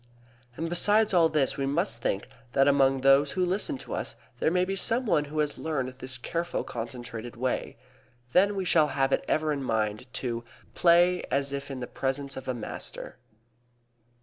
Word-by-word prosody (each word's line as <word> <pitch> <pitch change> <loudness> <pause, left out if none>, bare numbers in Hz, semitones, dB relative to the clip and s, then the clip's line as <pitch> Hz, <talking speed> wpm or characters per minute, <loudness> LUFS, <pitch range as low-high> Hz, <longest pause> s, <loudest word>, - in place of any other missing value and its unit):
And 165 - -2
besides 205 +5 +3
all 170 -3 +5
this 150 -4 +1
we 135 -1 -1
must 145 - -1
think 100 - -1 0.3
that 135 0 +4
among 135 -1 +4
those 135 +1 +5
who 185 -1 +1
listen 200 - -1
to - - -8
us - - -4 0.2
there - - +2
may 180 +2 +2
be 195 +1 -2
some 230 +6 +1
one 150 -9 +2
who 150 +2 -8
has 150 -1 0
learned 150 -5 -2
this 130 0 -5
careful 170 +7 -3
concentrated 120 -1 -6
way. 125 0 -2 0.5
Then 200 +6 +4
we 190 -1 -2
shall 160 -3 +4
have 135 -1 0
it - - +1
ever 155 -1 +1
in 140 - -3
mind 110 0 -2
to 120 -2 -3 0.3
"play 175 +1 +4
as 140 0 0
if 140 0 -4
in 135 -2 -5
the - - -2
presence 135 +2 -3
of 130 - -8
a 130 - -1
master." 115 - -6
140 Hz, 185 wpm, -28 LUFS, 130-175 Hz, 0.5 s, all